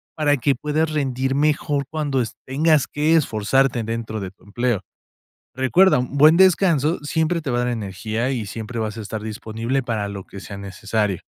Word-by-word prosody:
para 145 -2 +2
que 140 +2 +1
puedas 155 +4 -1
rendir 135 -3 -1
mejor 145 -1 +1
cuando 145 -4 0
es 110 - -7
tengas 150 +1 +3
que 150 +2 +1
esforzarte 130 -2 +2
dentro 115 -1 -4
de 95 -2 -5
tu 95 - -28
empleo. 120 0 -1 0.7
Recuerda, 130 +8 +4
un 125 +3 -3
buen 155 +3 +7
descanso 175 -4 +4
siempre 160 +2 0
te 145 - -3
va 120 - 0
a 125 - +1
dar - - -1
energía, 110 +2 -2
y 120 -6 -2
siempre 115 +3 -6
vas 110 -1 -3
a 110 - -5
estar 105 +1 -5
disponible 115 +4 -3
para 110 -4 -2
lo 100 -1 -7
que 100 - -10
sea 100 - -8
necesario. 100 0 -2
125 Hz, 185 wpm, -22 LUFS, 110-150 Hz, 0.7 s, buen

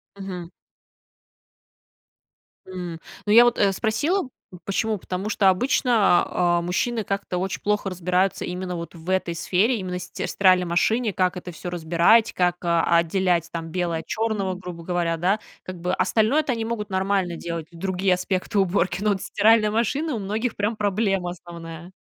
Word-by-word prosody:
Мгм. 185 -3 -7 2.2
М, 180 -3 -6 0.3
ну, 210 - 0
я 240 +2 +9
вот, 240 - +2
э, 200 -1 +4
спросила 275 - 0 0.4
почему? 215 +2 -1
Потому 190 +2 -4
что 200 -3 +4
обычно, 215 -2 +3
а, 175 -1 +1
мужчины 215 +6 -1
как-то 195 -2 -3
очень 190 +1 -3
плохо 210 -1 0
разбираются 185 +1 0
именно 180 0 -4
вот 170 +1 -7
в 165 +2 -9
этой 185 -3 0
сфере, 200 +9 +1
именно 180 -2 -4
стир 175 - -5
в - - -6
стиральной 185 -2 +4
машине, 215 +7 +1
как 185 -1 0
это 180 0 -7
всё 175 +2 -7
разбирать, 175 +6 +3
как, 180 -1 +1
а, 170 0 +3
отделять 170 0 +1
там 165 -1 -5
белое 170 -2 -1
от - - -9
чёрного, 215 -4 -1
грубо 180 -2 -8
говоря, 170 -2 0
да, 190 +6 +1 0.2
как 185 -2 -8
бы 180 +1 -1
остальное-то 250 +9 +2
они 230 -1 -3
могут 225 -2 -4
нормально 190 -2 0
делать 170 -1 -5
и - - -16
другие 190 +1 +1
аспекты 185 +2 -2
уборки. 190 0 +1
Но 215 - +2
вот 195 -2 0
стиральная 215 0 +3
машина 270 +6 0
у - - -3
многих 215 +4 -2
прям 210 +2 -1
проблема 195 -3 0
основная. 170 0 -10
185 Hz, 165 wpm, -24 LUFS, 175-210 Hz, 2.2 s, я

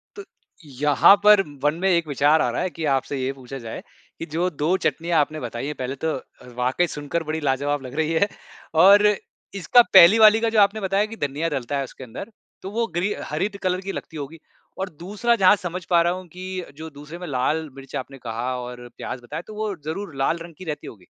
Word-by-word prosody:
तो 410 - -8 0.6
यहाँ 150 +6 +6
पर 210 -1 +7 0.2
मन 150 +1 +3
में 195 - +2
एक 170 -3 +2
विचार 145 +2 +3
आ - - +1
रहा - - -2
है 185 - -1
कि 160 - -2
आपसे 135 +1 -4
ये 130 - -1
पूछा 135 0 -9
जाए 115 -2 -7 0.4
कि - - -4
जो 175 +3 +1
2 160 +2 0
चटनियाँ 170 0 +1
आपने 155 +1 0
बताई 120 +1 -5
हैं, 150 - -4
पहले 130 +1 -4
तो 160 +3 -2
अ, 130 - -16
वाक़ई 130 +8 +1
सुनकर 150 +2 -4
बड़ी 155 +1 -3
लाजवाब 145 +1 0
लग 130 - -8
रही 160 +1 0
हैं 180 +5 +3 0.6
और 200 +2 +7 0.6
इसका 240 +9 +6
पहली 190 +3 +9
वाली 215 0 +7
का 230 - +2
जो - - +5
आपने 205 +2 +2
बताया 195 +2 +1
कि - - -6
धनिया 145 +2 -2
डलता 140 -1 -3
है 140 - -1
उसके 135 - -10
अंदर, 130 - -8 0.3
तो 190 - -7
वो 230 +2 -1
ग्री 195 +4 0 0.2
हरी 175 +7 0
ड 200 - -11
कलर 185 0 0
की 195 - -5
लगती 160 -4 -7
होगी। 150 +3 -7 0.4
और 190 0 -3
दूसरा, 210 +7 0
जहाँ 195 -2 +6
समझ 180 -2 -6
पा 170 -1 +5
रहा 170 +1 +2
हूँ 185 0 -8
कि 185 +2 -6
जो 160 +1 -7
दूसरे 150 +3 -9
में 180 - -7
लाल 150 +4 -1
मिर्च 135 -1 -10
आपने 135 +1 -6
कहा 120 +2 -3
और 125 0 -8
प्याज़ 125 - -6
बताया, 145 +7 -6
तो 215 - -9
वो 210 -2 -3
ज़रूर 165 +1 -5
लाल 135 +5 0
रंग 170 -1 -10
की 185 - -10
रहती 150 -3 -5
होगी? 95 -5 -12
160 Hz, 230 wpm, -23 LUFS, 140-190 Hz, 0.6 s, पहली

